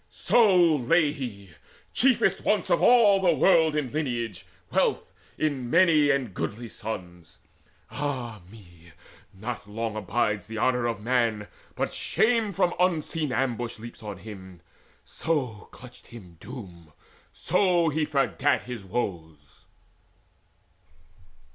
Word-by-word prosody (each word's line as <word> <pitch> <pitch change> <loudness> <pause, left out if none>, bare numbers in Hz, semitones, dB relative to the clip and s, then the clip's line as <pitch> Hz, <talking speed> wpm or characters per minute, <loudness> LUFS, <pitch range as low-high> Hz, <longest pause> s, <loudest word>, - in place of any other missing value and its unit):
So 180 -9 +4
lay 150 +4 +2
he, 100 -9 -7 0.4
chiefest 260 0 +2
once - - +1
of - - +3
all 215 -6 +6
the 175 -4 +3
world 160 0 +4
In 140 -5 -2
lineage, 120 - -3 0.2
wealth, - - 0 0.2
in 140 -6 -2
many 165 -3 +4
and 135 -7 0
goodly 115 +5 -5
sons. 90 -7 -8 0.5
Ah 125 -7 -4
me, 85 -6 -17 0.4
not 110 +1 -7
long 110 +1 -4
abides 105 -1 -1
the 110 0 -7
honour 125 +1 +1
of 115 -3 -4
man, 115 -4 0 0.3
But - - -2
shame 225 -2 +1
from 175 -1 +1
unseen 165 -4 0
ambush 120 -2 -2
leaps 115 +3 -11
on 105 -3 -7
him 95 -4 -11 0.4
So 130 -10 -3
clutched 125 -1 -14
him 95 -8 -13
Doom, 90 - -11 0.4
so 180 -2 +2
he 155 +1 -1
forgat 145 -1 +1
his 125 -5 -7
woes. 85 -8 -6
125 Hz, 120 wpm, -26 LUFS, 105-155 Hz, 0.5 s, all